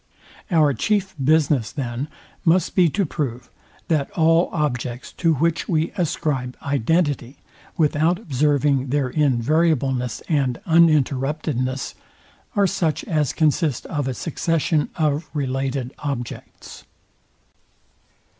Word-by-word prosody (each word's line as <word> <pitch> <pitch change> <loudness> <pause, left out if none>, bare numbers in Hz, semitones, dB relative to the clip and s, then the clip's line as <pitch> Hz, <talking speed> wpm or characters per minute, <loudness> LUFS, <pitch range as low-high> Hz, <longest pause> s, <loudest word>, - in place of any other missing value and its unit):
Our 155 -6 +4
chief 200 +4 0
business, 145 -5 +2
then, 130 -1 -4 0.4
must 175 0 +2
be 180 -3 +4
to 200 +5 0
prove, 130 -6 -4 0.4
that 150 -4 +1
all 165 +1 +4
objects, 125 -5 -2
to 165 -3 +2
which 165 +3 0
we 160 -2 +1
ascribe 150 -8 -2
identity, 140 -1 0 0.4
without 160 +2 +2
observing 145 - +1
their 135 -1 0
invariableness 135 -3 +1
and 140 -5 0
uninterruptedness, 145 - +1 0.6
are 200 - +4
such 180 -5 0
as 155 - 0
consist 155 -3 +1
of 145 -4 -2
a 130 - -2
succession 165 0 0
of 155 -1 0
related 135 -2 -2
objects. 135 -5 -6
150 Hz, 105 wpm, -22 LUFS, 130-165 Hz, 0.6 s, Our